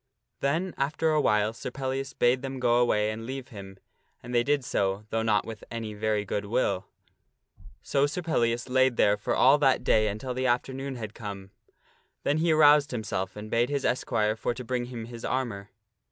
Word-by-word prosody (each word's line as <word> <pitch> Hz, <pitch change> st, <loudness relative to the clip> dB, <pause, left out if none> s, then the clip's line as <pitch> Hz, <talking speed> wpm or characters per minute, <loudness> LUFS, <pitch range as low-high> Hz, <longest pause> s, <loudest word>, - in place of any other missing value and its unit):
Then 165 Hz, +6 st, 0 dB
after 155 Hz, +3 st, +1 dB
a 155 Hz, -1 st, +3 dB
while 105 Hz, -2 st, +2 dB
Sir 115 Hz, -, -6 dB
Pellias 135 Hz, +1 st, -4 dB
bade 125 Hz, 0 st, +2 dB
them 135 Hz, -1 st, -5 dB
go 120 Hz, -1 st, +3 dB
away 105 Hz, -3 st, +2 dB
and 110 Hz, +1 st, -6 dB
leave 135 Hz, 0 st, -6 dB
him, 95 Hz, -4 st, -10 dB, 0.5 s
and 120 Hz, +1 st, -7 dB
they 120 Hz, -, +4 dB
did 140 Hz, +1 st, 0 dB
so, 100 Hz, 0 st, -1 dB
though 115 Hz, -, 0 dB
not 110 Hz, -2 st, +2 dB
with 110 Hz, -2 st, -8 dB
any 115 Hz, -2 st, -5 dB
very 105 Hz, 0 st, -1 dB
good 100 Hz, +1 st, -3 dB
will. 100 Hz, -3 st, 0 dB, 1.0 s
So 140 Hz, +1 st, +2 dB
Sir 175 Hz, +5 st, -4 dB
Pellias 120 Hz, -7 st, 0 dB
lay 130 Hz, 0 st, +4 dB
there 105 Hz, -4 st, +3 dB
for 105 Hz, -, -2 dB
all 140 Hz, +3 st, +5 dB
that 135 Hz, -2 st, +3 dB
day 110 Hz, 0 st, +3 dB
until 110 Hz, +5 st, -4 dB
the 130 Hz, +1 st, -1 dB
afternoon 130 Hz, +2 st, -1 dB
had 110 Hz, -3 st, -6 dB
come. 100 Hz, -4 st, -8 dB, 0.7 s
Then 145 Hz, +2 st, +1 dB
he 165 Hz, +1 st, +2 dB
aroused 150 Hz, -2 st, +6 dB
himself 110 Hz, -5 st, -3 dB
and 105 Hz, +1 st, -8 dB
bade 120 Hz, +2 st, +2 dB
his 140 Hz, -1 st, -1 dB
esquire 110 Hz, -3 st, +1 dB
for 115 Hz, +2 st, -2 dB
to 125 Hz, -, -6 dB
bring 125 Hz, 0 st, -1 dB
him 120 Hz, -2 st, -7 dB
his 120 Hz, 0 st, -10 dB
armor. 115 Hz, -6 st, -3 dB
120 Hz, 195 wpm, -27 LUFS, 110-135 Hz, 1.0 s, aroused